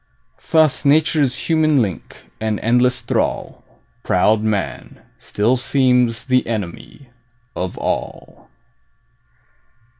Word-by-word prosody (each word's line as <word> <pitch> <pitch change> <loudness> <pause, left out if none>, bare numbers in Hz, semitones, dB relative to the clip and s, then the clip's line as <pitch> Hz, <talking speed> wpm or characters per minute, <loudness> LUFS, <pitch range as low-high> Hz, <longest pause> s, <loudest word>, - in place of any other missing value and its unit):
Thus 155 -3 +3
nature's 145 -2 +2
human 155 -3 +3
link 100 -7 -4
and 110 -1 -2
endless 125 +2 +2
thrall, 115 - -2 0.4
Proud 105 +4 +2
man, 100 -11 -3 0.2
still 110 +5 0
seems 125 -3 +1
the 130 -1 +1
enemy 110 - -6 0.4
of 90 0 -4
all. - - -5
125 Hz, 90 wpm, -19 LUFS, 110-140 Hz, 0.4 s, Thus